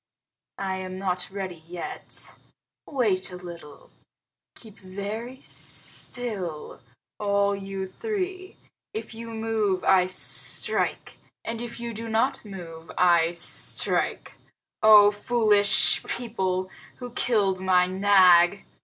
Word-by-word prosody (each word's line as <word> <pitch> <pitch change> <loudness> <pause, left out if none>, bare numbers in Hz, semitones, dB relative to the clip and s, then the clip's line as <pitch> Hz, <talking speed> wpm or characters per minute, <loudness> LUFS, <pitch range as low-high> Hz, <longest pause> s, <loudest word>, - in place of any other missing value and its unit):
I 190 -1 -3
am 185 0 -7
not 185 -2 -3
ready 190 -4 -7
yet. 175 0 -6 0.5
Wait 205 -9 0
a - - -8
little. 170 -4 -12 0.6
Keep 220 -2 -15
very 205 +7 -7
still, 195 -11 0 0.4
all 200 -1 +1
you 195 -1 -6
three! 375 - -5 0.4
If 440 - -6
you 230 +1 -9
move 220 -4 -1
I 185 -1 +4
strike, 185 0 +2 0.3
and 230 0 -4
if 240 0 -7
you 235 0 -5
do 225 +2 -7
not 225 +5 0
move 170 -6 -10
I 170 -2 +4
strike. 170 0 -1 0.5
Oh, 210 -1 +7
foolish 210 -1 +3
people, 190 -6 -3 0.2
who 245 -1 -9
killed 205 -6 0
my 185 -1 +3
Nag!" 185 -1 +4
200 Hz, 110 wpm, -25 LUFS, 185-225 Hz, 0.6 s, Oh